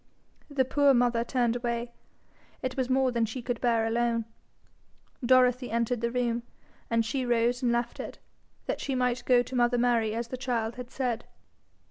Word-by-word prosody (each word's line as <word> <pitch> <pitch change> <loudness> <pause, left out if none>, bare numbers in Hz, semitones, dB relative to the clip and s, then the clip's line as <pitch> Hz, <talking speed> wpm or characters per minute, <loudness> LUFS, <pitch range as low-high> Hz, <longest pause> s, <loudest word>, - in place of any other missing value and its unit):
The 275 -3 +1
poor 280 +1 +4
mother 240 -1 +2
turned 240 -1 0
away. 240 0 -2 0.7
It 255 0 -2
was 260 -2 -1
more 260 0 +3
than 235 -1 0
she 240 +3 -6
could 245 -1 -3
bear 230 -2 +2
alone. 230 0 0 1.0
Dorothy 250 0 +4
entered 235 +1 0
the 235 - +1
room, 240 -1 0 0.5
and 230 -1 +2
she 255 +4 -1
rose 240 +1 +1
and 245 -2 +2
left 235 0 -1
it, - - -6 0.5
that - - -3
she 270 - -2
might 250 -1 0
go 245 -1 +5
to 255 +2 -7
mother 245 0 +3
Mary 235 -3 +2
as 235 0 -3
the 255 - -4
child 235 -3 -1
had 250 -1 -7
said. 245 -4 -2
240 Hz, 175 wpm, -28 LUFS, 235-255 Hz, 1.0 s, go